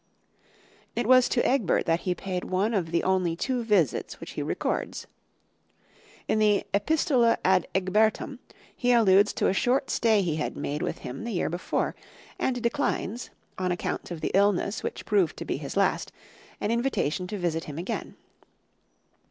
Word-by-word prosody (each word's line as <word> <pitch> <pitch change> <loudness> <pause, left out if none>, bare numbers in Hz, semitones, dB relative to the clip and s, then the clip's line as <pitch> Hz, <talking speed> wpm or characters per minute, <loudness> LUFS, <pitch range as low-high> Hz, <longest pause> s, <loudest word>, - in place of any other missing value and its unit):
It 240 - 0
was 255 +1 +6
to 240 - +2
Egbert 255 -8 +2
that 165 0 +2
he 180 - +1
paid 185 -1 -4
one 195 +5 0
of 180 -6 0
the 170 +1 0
only 185 -3 +1
two 250 +6 -1
visits 200 - +1
which - - -8
he - - -4
records. - - -2 1.2
In 215 - +1
the 210 -1 +3
"Epistola 240 +1 +3
ad 185 -2 +3
Ecgbertum" 205 +4 +1 0.4
he 245 -1 +2
alludes 205 -3 +5
to - - +1
a - - +2
short 255 +7 +1
stay 220 -3 +3
he 160 -4 -1
had 150 - -3
made 150 +2 -3
with - - -2
him 125 - -6
the 235 -1 -4
year 175 - -1
before, 175 +1 -1 0.5
and 245 -2 -1
declines, 240 -2 -1 0.3
on 185 -1 0
account 175 - -3
of 170 -3 -6
the - - -1
illness 200 +1 +2
which - - -5
proved 200 -6 +2
to - - -6
be - - -2
his - - -6
last, - - +1 0.5
an 210 - -1
invitation 230 - 0
to 210 - -4
visit 165 -3 -1
him 145 -1 -7
again. 175 +3 -4
200 Hz, 170 wpm, -27 LUFS, 180-235 Hz, 1.2 s, was